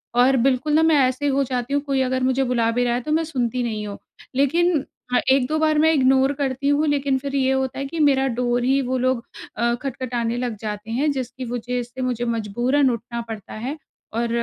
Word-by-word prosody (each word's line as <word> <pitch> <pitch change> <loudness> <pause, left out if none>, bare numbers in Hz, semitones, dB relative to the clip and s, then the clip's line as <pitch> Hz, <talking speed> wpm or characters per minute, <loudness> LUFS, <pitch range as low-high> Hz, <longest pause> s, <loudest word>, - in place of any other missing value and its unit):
और 255 +2 +5
बिल्कुल 265 +4 +1
ना 315 +1 +5
मैं 320 -1 +4
ऐसे 260 +3 -2
हो 275 0 +2
जाती 250 0 -3
हूँ, 285 - +2
कोई 275 -2 0
अगर 260 0 0
मुझे 260 +1 +2
बुला 235 -3 +1
भी 245 +2 +1
रहा 240 -1 +1
है 245 - -1
तो 300 - -4
मैं 320 +1 +2
सुनती 250 -5 -1
नहीं 215 -3 -3
हूँ। 200 - -6 0.4
लेकिन 315 +3 +2 0.3
हाँ, 245 - +5
1-2 275 +3 +2
बार 310 -1 +2
मैं 320 +1 +4
इग्नोर 265 0 +4
करती 275 0 0
हूँ 295 +2 +2
लेकिन 280 -2 +1
फिर 280 +1 -5
ये 265 -1 +2
होता 265 0 -1
है 275 - -2
कि 315 +4 -5
मेरा 270 -2 +3
डोर 245 0 +1
ही 270 +2 +2
वो 260 0 -1
लोग 255 -1 0 0.3
अ, 235 +1 +2
खटखटाने 245 -3 -2
लग 245 -3 -3
जाते 210 0 -5
हैं 285 +6 +1
जिसकी 260 -1 -5
वजह 245 +1 -2
से 245 +2 -9
मुझे 245 -2 -1
मजबूरन 240 +5 +1
उठना 235 0 -4
पड़ता 215 -3 -7
है, 255 +8 -5 0.4
और 235 +1 -1
260 Hz, 220 wpm, -22 LUFS, 240-275 Hz, 0.4 s, और